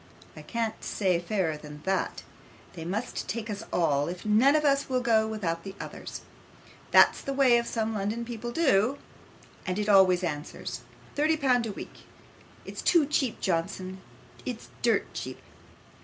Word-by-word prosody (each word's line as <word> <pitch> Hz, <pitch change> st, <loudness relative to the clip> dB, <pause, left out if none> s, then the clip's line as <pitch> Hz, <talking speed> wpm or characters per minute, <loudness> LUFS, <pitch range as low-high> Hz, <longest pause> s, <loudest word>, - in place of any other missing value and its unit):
I -, -, -9 dB
can't 230 Hz, -2 st, -3 dB
say 185 Hz, -4 st, +1 dB
fairer 175 Hz, -4 st, -1 dB
than 150 Hz, 0 st, -11 dB
that. 190 Hz, -1 st, -1 dB, 0.5 s
They 165 Hz, -, -7 dB
must 205 Hz, +8 st, -3 dB
take 225 Hz, +3 st, -3 dB
us 205 Hz, 0 st, -4 dB
all, 145 Hz, -4 st, +2 dB
if 180 Hz, +3 st, -6 dB
none 230 Hz, +7 st, +5 dB
of 305 Hz, 0 st, +2 dB
us 275 Hz, -1 st, +2 dB
will 255 Hz, -1 st, +2 dB
go 225 Hz, -3 st, +3 dB
without 175 Hz, -7 st, -2 dB
the 195 Hz, 0 st, -8 dB
others. -, -, -7 dB, 0.7 s
That's -, -, +6 dB
the 275 Hz, -, -3 dB
way 255 Hz, -4 st, +5 dB
some 225 Hz, -2 st, -2 dB
of -, -, -3 dB
the 215 Hz, -, -2 dB
London 215 Hz, +4 st, -2 dB
people 240 Hz, 0 st, -5 dB
do, 265 Hz, -4 st, +3 dB, 0.7 s
and 185 Hz, +1 st, -2 dB
it 210 Hz, 0 st, -1 dB
always 190 Hz, -3 st, +6 dB
answers. 150 Hz, -3 st, -4 dB, 0.3 s
Thirty 310 Hz, +2 st, +2 dB
pound 250 Hz, -5 st, +2 dB
a -, -, -3 dB
week -, -, -10 dB, 0.6 s
it's -, -, -6 dB
too 335 Hz, -4 st, +4 dB
cheap, 275 Hz, -4 st, 0 dB
Johnson. 185 Hz, +1 st, -2 dB, 0.4 s
It's -, -, -6 dB
dirt -, -, +3 dB
cheap. -, -, -5 dB
215 Hz, 165 wpm, -28 LUFS, 185-245 Hz, 0.7 s, That's